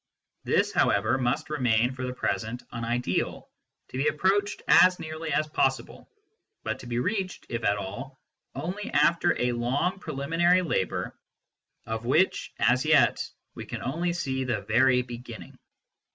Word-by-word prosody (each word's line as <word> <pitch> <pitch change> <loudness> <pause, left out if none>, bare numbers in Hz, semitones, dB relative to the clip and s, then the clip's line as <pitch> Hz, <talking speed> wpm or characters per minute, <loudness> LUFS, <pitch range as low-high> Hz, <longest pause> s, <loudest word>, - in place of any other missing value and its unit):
\ - - -55
This, - - +2
however, 110 +6 +2
must 125 +4 -1
remain 125 -4 +2
for 130 0 -6
the - - -3
present 110 +3 -2
an 115 -1 -5
ideal, 120 -5 -2 0.4
to 130 - -5
s - - +1
be - - +4
approached 200 +5 0
as 180 0 +6
nearly 155 0 -5
as 150 +2 +2
possible, 155 - -1 0.5
but - - -3
to 125 - -10
be 120 0 -2
reached, 185 - -2
if 115 -1 -3
at 100 0 +2
all, 125 +8 -7 0.4
only 180 +9 -4
after 170 +4 +2
a 125 0 +1
long 130 +11 -1
preliminary 165 +4 +1
labour 95 - -2 0.7
of 110 0 -4
which 135 +10 +1
as 130 +1 +3
yet 155 -4 +4 0.3
we - - -7
can - - -6
only 170 +7 -1
see 130 -6 -2
the 120 -4 -1
very 125 +3 +3
beginning. 120 -2 -10
130 Hz, 155 wpm, -27 LUFS, 120-165 Hz, 0.7 s, as